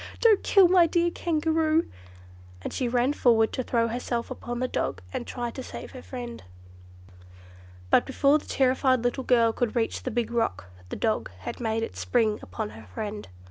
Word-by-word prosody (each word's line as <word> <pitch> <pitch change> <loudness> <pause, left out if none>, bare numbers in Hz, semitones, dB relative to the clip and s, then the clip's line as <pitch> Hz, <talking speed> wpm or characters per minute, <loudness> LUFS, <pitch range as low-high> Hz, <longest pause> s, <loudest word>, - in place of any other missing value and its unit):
Don't 445 -4 +5
kill 390 -3 +6
my 350 -1 +5
dear 345 +1 +1
Kangaroo!" 320 -1 +1 0.8
and - - -5
she 255 - -1
ran 245 +3 +2
forward 225 -5 +3
to - - -1
throw 235 -2 +1
herself 235 0 -3
upon 240 0 -5
the 255 - 0
dog 95 - -2
and - - -4
try 240 -2 -4
to 260 - -7
save - - -8
her 255 - -9
friend. 245 -2 -7 1.5
But - - +4
before 280 +2 +3
the - - -16
terrified 260 -1 +2
little 245 +2 -1
girl 230 -3 +3
could 240 0 -1
reach 230 -2 0
the - - -3
big 235 -1 -2
rock, 225 - -1 0.2
the - - -4
dog 220 -2 -1
had - - -6
made 225 -1 -1
its - - -6
spring 220 -3 +1
upon 90 +3 -5
her 110 0 -12
friend. 205 - -6
245 Hz, 180 wpm, -26 LUFS, 225-275 Hz, 1.5 s, kill